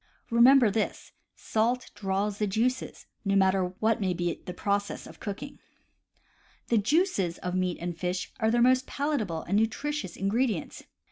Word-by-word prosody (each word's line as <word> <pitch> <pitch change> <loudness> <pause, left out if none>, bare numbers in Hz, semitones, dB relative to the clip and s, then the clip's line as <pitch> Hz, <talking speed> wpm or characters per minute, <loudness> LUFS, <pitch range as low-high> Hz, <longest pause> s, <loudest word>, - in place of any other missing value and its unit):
Remember 240 -1 +6
this: 215 +1 -2 0.2
salt 235 +3 -1
draws 200 +1 -2
the 210 - +1
juices, 240 +6 -1 0.2
no 200 -1 +1
mat 190 -1 +5
ter 190 -1 +1
what 220 0 +1
may 185 -2 0
be 175 -1 -2
the - - -3
process 200 +1 -1
of - - -13
cooking. 225 +8 -6 1.1
The 230 - +4
juices 215 - +1
of 180 -1 -4
meats 185 -2 -1
and 175 -1 -3
fish 180 +2 -3
are 220 - +2
their 235 +1 +3
most 255 +1 +3
palatable 235 - -2
and 200 +4 +1
nutritious 225 - -2
ingredients. 210 -1 -1
210 Hz, 155 wpm, -28 LUFS, 190-240 Hz, 1.1 s, Remember